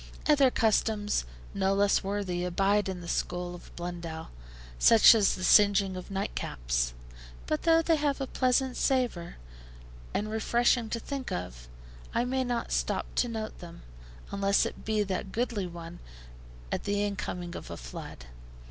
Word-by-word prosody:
Other 285 -3 +5
customs, 215 - +1 0.3
no 195 0 +1
less 200 0 +3
worthy, 190 -3 -2
abide 195 +3 +1
in 185 -2 -5
the 170 - -9
school 175 +1 -2
of 175 - -11
Blundell, 170 -2 -6 0.5
such 230 0 +8
as 215 -3 +3
the 185 - -6
singeing 200 0 +5
of 185 +2 -8
nightcaps; - - -2 0.5
but 155 - -1
though 330 0 +4
they 325 -1 +3
have 290 -2 0
a 270 - -1
pleasant 255 0 +1
savour, 245 -11 0 0.8
and 215 +1 -2
refreshing 235 +1 +2
to 230 - -2
think 275 +2 -5
of, 60 -9 -5 0.5
I 240 - +2
may 260 +1 0
not 245 -2 -2
stop - - -1
to 245 - +3
note 220 -1 -5
them, 170 -1 -11 0.5
unless 200 0 +2
it - - -7
be 215 -1 +1
that 190 -1 -4
goodly 230 -5 -1
one 170 0 -9 0.7
at - - -3
the 205 0 0
incoming 180 -3 -4
of - - -8
a - - -6
flood. - - -9
200 Hz, 155 wpm, -29 LUFS, 175-235 Hz, 0.8 s, such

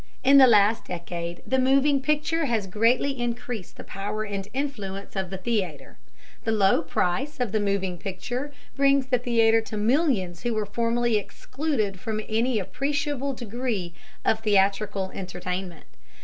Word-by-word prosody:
In 275 +1 +7
the 260 - +9
last 215 -1 +4
decade 170 -1 -5
the 265 - +1
moving 275 +2 +3
picture 300 +3 +1
has 230 -6 0
greatly 240 +7 +1
increased 240 -4 -4
the - - -8
power 210 +2 -4
and 200 -2 -4
influence 210 -8 -4
of 190 -2 -2
the 190 - -5
theatre. 185 -7 -3 0.4
The 225 - 0
low 200 -5 +4
price 180 - -1
of 245 -5 -1
the 215 - +1
moving 195 -3 -1
picture 245 - -4 0.2
brings 275 -1 +3
the 255 -2 +1
theatre 225 -2 +3
to 220 -1 -6
millions 210 - +1
who 220 -1 -1
formerly 235 +2 0
were - - 0
excluded 220 -6 -3
from 215 +2 -3
any 230 +2 +1
appreciable 275 +7 -2
degree 230 -7 -3 0.3
of 220 - +3
theatrical 200 -2 +1
entertainment. 180 -2 -5
220 Hz, 150 wpm, -25 LUFS, 195-255 Hz, 0.4 s, the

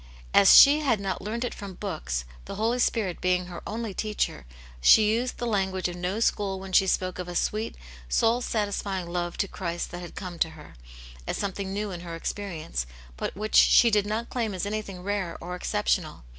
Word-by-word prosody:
As 195 - +8
she 290 +2 +9
had 260 -8 +1
not 195 -1 -3
learned 230 +4 -3
it - - -4
from 195 -2 -8
books, 110 - -4 0.2
the - - -6
Holy 230 +4 0
Spirit 210 -7 0
being 180 0 +1
her 175 -1 -8
only 220 -1 -4
teacher, 210 - -2 0.3
she 210 - +7
used 245 +3 -1
the 240 - -3
language 190 -4 0
of 175 - -6
no 180 +4 -2
school 200 -4 0
when 190 0 -9
she 190 - +5
spoke 185 0 0
of 180 - -4
a 175 - -6
sweet, 215 +5 -1 0.3
soul 230 - +2
satisfying 200 -5 -2
love 175 0 -3
to 200 - 0
Christ 175 -2 -4
that 175 - -6
had 175 - -9
come 180 -3 -7
to 160 - +2
her, 150 - -13 0.5
as - - -2
something 195 -1 -3
new 205 +1 -3
in 175 - -5
her 170 -1 -7
ex 165 - -3
perience, 160 - -5 0.3
but - - -4
which 215 +1 -4
she 235 - +7
did 205 -1 +2
not 220 +3 -3
claim 225 -5 -1
as 185 - -2
anything 205 -3 -4
rare 200 -3 -2
or 180 +1 -5
exceptional. 180 - -1
195 Hz, 205 wpm, -27 LUFS, 180-215 Hz, 0.5 s, she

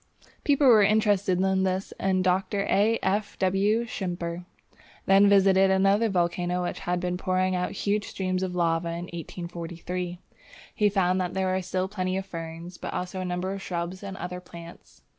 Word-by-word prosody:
People 285 -1 +3
were 230 -5 +7
interested 205 -3 +3
in 190 0 +2
this, 190 +1 -1
and 190 -1 +1
Dr. 190 +2 +1
A. 210 +4 +2
F. 205 +2 -1
W. 200 +5 +2
Schimper 175 -5 -4 0.6
then 195 +1 +6
visited 195 -1 +5
another 195 +4 +3
volcano 180 -1 0
which 175 - -3
had 180 0 -1
been 180 0 -2
pouring 185 0 0
out 180 0 -2
huge 205 +1 -1
streams 185 -1 -2
of 185 -1 -3
lava 170 -1 +1
in 170 +1 -4
1843. 175 +1 -5 0.6
He 210 -2 +3
found 185 -2 +1
that 180 0 -3
there 190 -1 0
were 190 - 0
still 185 +1 -2
plenty 185 -2 -2
of 190 - -3
ferns, 165 0 -8
but - - -5
also 185 +1 -3
numbers 185 +2 -2
of - - -9
shrubs 175 0 -4
and 195 -1 -7
other 180 +1 -5
plants. 170 -1 -13
185 Hz, 170 wpm, -26 LUFS, 180-195 Hz, 0.6 s, were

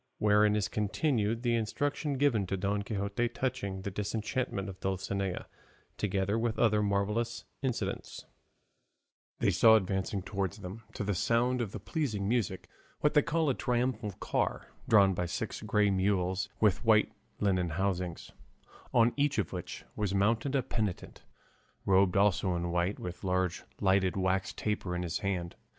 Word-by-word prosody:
WHEREIN 105 0 +4
IS 105 -2 +1
CONTINUED 115 +1 0
THE 120 -1 +2
INSTRUCTION 140 +5 -1
GIVEN 125 -9 +2
TO 95 - -1
DON 100 +2 0
QUIXOTE 100 +3 -2
TOUCHING 120 -8 -2
THE 100 - -3
DISENCHANTMENT 105 +1 -2
OF 95 -1 -8
DULCINEA, 95 0 -2 0.5
TOGETHER 100 +2 0
WITH 115 -1 -1
OTHER 110 -3 +3
MARVELLOUS 105 +4 -1 0.2
INCIDENTS 130 -4 -3 1.1
They - - +2
saw 110 -1 +7
advancing 95 -1 0
towards 100 0 -3
them, 100 +2 -8
to - - -2
the 100 0 0
sound 120 +6 +1
of 110 -5 -3
this 105 - -8
pleasing 115 - -1
music, 105 -5 -1 0.3
what 150 - +3
they 150 - +6
call 165 +1 0
a - - +1
triumphal 120 -4 -1
car, - - -2 0.2
drawn 100 -3 +6
by 90 0 -2
six - - -4
grey 105 -1 +2
mules 95 0 +1
with 105 -1 +3
white 110 -2 +4 0.3
linen 95 -4 +1
housings, 90 0 -2 0.6
on 115 0 +4
each 145 0 +1
of 100 -8 -1
which - - -6
was 100 -2 -1
mounted 115 +7 +1
a 135 - +2
penitent, 110 -7 -3 0.6
robed 95 -1 +4
also 100 -2 +3
in 85 0 -2
white, 90 +3 0
with 90 0 -7
a - - -2
large 90 -1 0
lighted 95 -1 +2
wax 95 0 +1
taper 105 -4 -2
in 90 - -2
his 85 0 -2
hand. 90 -4 -2
100 Hz, 155 wpm, -31 LUFS, 95-115 Hz, 1.1 s, saw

